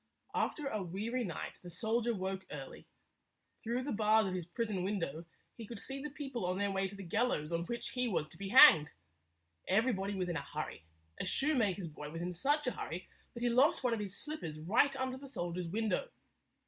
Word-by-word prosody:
After 300 - 0
a 215 -7 -1
weary 210 +8 -2
night, 180 -7 -5
the 175 - -9
soldier 225 +6 0
woke 190 0 -3
early. 135 -2 -8 0.8
Through 240 +3 -1
the 285 - -3
bars 215 0 +4
of 185 - -2
his 180 -3 -3
prison 205 +1 -2
window 170 -5 -2 0.3
he 225 -3 -8
could 230 -2 -7
see 270 +4 -5
the 300 - -4
people 270 -5 -5
on 180 +1 0
their 200 0 +1
way 195 0 +1
to 195 - -9
the 200 - -7
gallows 170 -4 0
on 170 0 0
which 235 +5 -3
he 250 -1 0
was 170 -8 0
to - - -13
be 200 -1 -4
hanged. 200 - +9 0.8
Everybody 200 -1 +2
was 185 -2 -1
in 175 -2 -1
a - - -2
hurry. 80 - -5 0.3
A - - -1
shoemaker's 210 - +1
boy 150 -1 -8
was 165 +2 -5
in 180 0 -2
such 290 - +1
a 250 - +1
hurry 175 -3 -5 0.3
that 235 - -5
he 240 - +3
lost 265 +5 +4
one 245 -2 +2
of 230 - -1
his 200 -2 -4
slippers 235 - -5
right 225 - +3
under 260 -1 -2
the 275 0 -10
soldier's 175 -7 -3
window. 220 - 0
205 Hz, 210 wpm, -34 LUFS, 180-245 Hz, 0.8 s, hanged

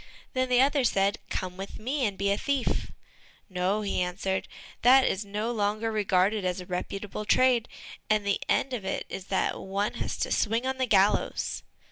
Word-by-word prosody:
Then 255 0 0
the 250 0 +5
other 280 0 +3
said, 200 -2 +2
"Come 185 -1 -4
with 195 +1 -7
me, 255 +2 -1
and 200 -2 -5
be 200 +1 +1
a - - +3
thief." 280 -3 -1 0.6
"No," 185 +3 0
he 195 -2 -1
answered, 185 +2 -2 0.3
"that 260 +2 +7
is 190 - 0
no 210 +3 -3
longer 215 0 0
regarded 205 -1 +2
as 180 0 -1
a 180 - -7
reputable 195 +3 -4
trade, 245 +2 +3 0.4
and 215 -1 +2
the 200 -1 0
end 265 - +1
of 230 -5 -3
it 190 - -3
is 190 - -6
that 190 -1 0
one 200 +2 -2
has - - -3
to - - -2
swing 230 +3 +1
on 265 0 -2
the 260 - +1
gallows." 200 -2 +2
205 Hz, 185 wpm, -28 LUFS, 195-245 Hz, 0.6 s, that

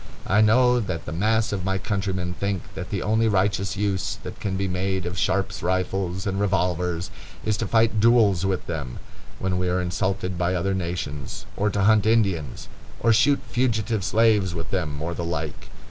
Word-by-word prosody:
I 105 +2 +3
know 125 +3 +5
that 95 -7 -4
the - - -5
mass 110 +6 +1
of 100 -3 -2
my 95 +1 0
countrymen 95 -2 -2
think 100 +1 -2
that 90 - -6
the 100 -3 -2
only 110 +1 +2
righteous 100 -1 +1
use 100 -2 -1
that - - -8
can 95 -2 -2
be 100 0 -1
made 95 0 -1
of 90 +1 -3
Sharp's 95 +1 0
rifles 95 +1 -1
and 95 -1 -1
revolvers 90 -3 0 0.3
is 110 - +1
to - - -2
fight 115 -1 +3
duels 110 -5 +4
with 95 -2 -1
them, 70 -7 -5 0.4
when 95 -1 -1
we 90 0 0
are 90 +1 +1
insulted 90 0 -2
by 90 +1 +1
other 95 +2 0
nations, 85 -7 -4
or 105 +1 +1
to 100 -1 0
hunt 105 0 +4
Indians, 95 - +1 0.3
or 115 - +4
shoot 140 +6 +3
fugitive 115 -4 0
slaves 105 -4 +3
with 80 -1 -5
them, 75 -2 -2
or 85 +1 -2
the 85 - -4
like. 80 -4 -4
95 Hz, 185 wpm, -24 LUFS, 90-105 Hz, 0.4 s, know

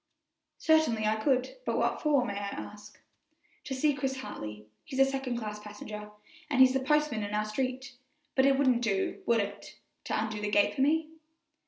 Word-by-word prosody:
"Certainly 315 -9 +3
I 215 +1 +2
could; 260 - 0
but - - -1
what - - 0
for, 285 -5 +3
may 200 - -3
I 200 0 -3
ask?" 210 +1 -8 0.7
"To 270 - -3
see 290 +3 +2
Chris 270 -1 -2
Hartley; 105 - -7 0.2
he's 265 - -7
a 270 - +6
second 270 -2 -2
class 210 -2 -5
passenger, 210 0 -8 0.4
and 275 -3 0
he's 260 0 +8
the 265 - +2
postman 300 -4 +1
in 205 0 -3
our 210 0 +1
street; 260 +4 -3 0.4
but 265 0 +4
it 275 -1 +4
wouldn't 255 -4 +3
do, 200 -5 -1
would 235 -1 +4
it, 200 0 -7 0.3
to - - -1
undo 215 -1 -3
the 210 - -1
gate 205 -1 +3
for 270 - -2
me?" 310 +3 +2
250 Hz, 190 wpm, -30 LUFS, 210-270 Hz, 0.7 s, he's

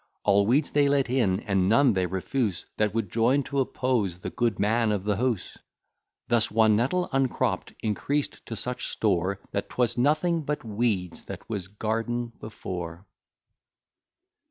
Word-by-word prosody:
All 100 0 +4
weeds 140 +6 +2
they 145 -1 +3
let 140 -3 +2
in, 110 -7 +2
and 95 -4 +1
none 125 +2 +5
they 95 -2 +1
refuse 95 +1 -2
That 105 -1 +2
would 110 -5 -1
join 125 +5 +3
to 140 +1 -2
oppose 125 -8 0
the 95 - -6
good 120 -4 0
man 110 +2 +2
of 100 -3 -1
the 105 -1 0
house. 120 -4 -2 0.7
Thus 120 -2 +2
one 110 0 +4
nettle 135 +11 +1
uncropp'd, 135 -2 0
increased 115 +8 -1
to 115 - -4
such 125 +3 -2
store, 95 -2 0
That 100 - -3
'twas 125 -1 0
nothing 155 +5 +2
but 150 0 -3
weeds 105 -5 -1
what - - -8
was 100 -5 -4
garden 115 +3 -2
before. 90 -4 -6
115 Hz, 155 wpm, -27 LUFS, 100-130 Hz, 0.7 s, none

